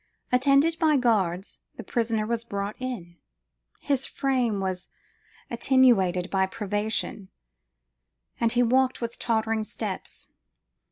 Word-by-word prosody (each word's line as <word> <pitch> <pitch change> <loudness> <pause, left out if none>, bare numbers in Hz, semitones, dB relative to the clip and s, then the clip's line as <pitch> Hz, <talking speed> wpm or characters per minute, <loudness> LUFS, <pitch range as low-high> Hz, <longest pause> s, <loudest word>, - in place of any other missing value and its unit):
Attended 275 +6 +3
by 310 -3 +4
guards, 195 -7 0 0.2
the - - -8
prisoner 225 -3 -1
was 230 +1 -2
brought 200 -2 -4
in: 220 -10 -6 0.6
his 275 -2 -1
frame 250 -6 0
was 185 -2 -3 0.6
attenuated 235 -8 +3
by 190 -1 +2
privation, 205 -1 -2 1.1
and 230 -1 +2
he 245 0 +3
walked 260 +2 +2
with 235 -1 -5
tottering 220 -1 0
steps. - - -6
230 Hz, 110 wpm, -26 LUFS, 200-255 Hz, 1.1 s, by